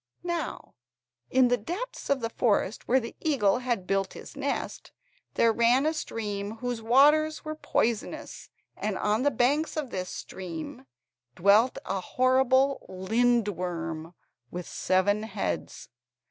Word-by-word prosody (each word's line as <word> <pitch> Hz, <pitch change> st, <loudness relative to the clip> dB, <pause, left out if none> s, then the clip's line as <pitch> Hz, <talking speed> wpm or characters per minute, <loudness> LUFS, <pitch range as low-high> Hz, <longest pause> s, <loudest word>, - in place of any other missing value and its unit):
Now, 345 Hz, -2 st, -4 dB, 0.6 s
in 255 Hz, -1 st, +4 dB
the 245 Hz, -, +2 dB
depths 375 Hz, -, -5 dB
of 280 Hz, -2 st, +2 dB
the 230 Hz, 0 st, -2 dB
forest 215 Hz, -3 st, 0 dB
where 260 Hz, +2 st, +4 dB
the 230 Hz, -2 st, -7 dB
eagle 250 Hz, -, +2 dB
had 240 Hz, -7 st, -2 dB
built 195 Hz, 0 st, 0 dB
his -, -, -11 dB
nest, 280 Hz, 0 st, -3 dB, 0.4 s
there 230 Hz, -1 st, +4 dB
ran 240 Hz, +5 st, +4 dB
a 315 Hz, -, +2 dB
stream 210 Hz, -7 st, -4 dB
whose 245 Hz, -1 st, -3 dB
waters 295 Hz, +7 st, +4 dB
were 310 Hz, -, -3 dB
poisonous, 235 Hz, -7 st, -2 dB, 0.3 s
and 210 Hz, -2 st, -2 dB
on 210 Hz, +2 st, +1 dB
the 285 Hz, -, +4 dB
banks 285 Hz, +5 st, +1 dB
of 290 Hz, -5 st, -3 dB
this 185 Hz, -1 st, -3 dB
stream 165 Hz, -7 st, -7 dB, 0.5 s
dwelt 205 Hz, +7 st, +4 dB
a 190 Hz, +1 st, -1 dB
horrible 260 Hz, +4 st, +2 dB
lindworm 185 Hz, -6 st, -1 dB, 0.3 s
with 180 Hz, +3 st, -6 dB
seven 200 Hz, +3 st, +1 dB
heads. 150 Hz, -, -4 dB
230 Hz, 130 wpm, -28 LUFS, 195-265 Hz, 0.6 s, in